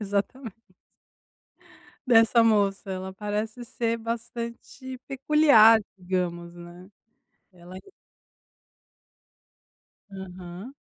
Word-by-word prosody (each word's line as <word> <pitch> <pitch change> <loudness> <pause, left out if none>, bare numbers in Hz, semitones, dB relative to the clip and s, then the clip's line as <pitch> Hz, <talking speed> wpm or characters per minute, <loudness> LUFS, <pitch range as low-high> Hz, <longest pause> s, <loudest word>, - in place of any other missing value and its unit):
exatamente 210 +3 -3 1.5
dessa 230 0 +5
moça, 205 -2 +1
ela 190 0 -6
parece 210 +4 -4
ser 230 -1 -2
bastante 235 +3 -7
peculiar 270 -5 +5 0.2
digamos, 180 -2 -3
né, 175 +2 -13 0.6
ela 180 +1 -12 2.3
Aham. 190 +3 -10
210 Hz, 65 wpm, -25 LUFS, 185-235 Hz, 2.3 s, dessa